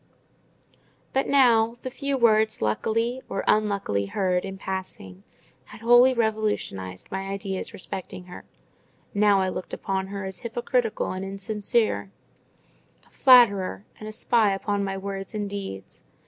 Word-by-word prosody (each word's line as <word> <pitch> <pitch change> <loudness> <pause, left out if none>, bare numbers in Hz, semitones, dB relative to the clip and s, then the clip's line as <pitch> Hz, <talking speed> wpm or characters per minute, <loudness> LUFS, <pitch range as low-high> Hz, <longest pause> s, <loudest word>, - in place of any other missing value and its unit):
But 270 - +1
now, 235 -4 +4
the 255 - -4
few 275 +1 -2
words 220 -2 +3
luckily 230 - 0
or 195 - -2
unluckily 200 - +1
heard 180 - 0
in 195 0 -6
passing 185 - -6 0.4
had 215 - -13
wholly 240 +2 +6
revolutionized 215 - -2
my 195 0 -3
ideas 195 -1 -4
respecting 185 -1 -7
her: 180 0 -11 0.7
now 205 -1 +4
I 190 - 0
looked 185 - -5
upon 190 -1 -2
her 200 0 -5
as 190 -1 -6
hypocritical 240 -1 -1
and 185 +1 -4
insincere, 195 - -1 1.0
a - - -27
flatterer, 200 - +5
and 215 - -8
a - - -6
spy 215 -2 +2
upon 200 +1 -1
my 195 -1 -3
words 195 +1 -6
and 205 -1 -2
deeds. 195 - -7
200 Hz, 135 wpm, -25 LUFS, 190-225 Hz, 1.0 s, wholly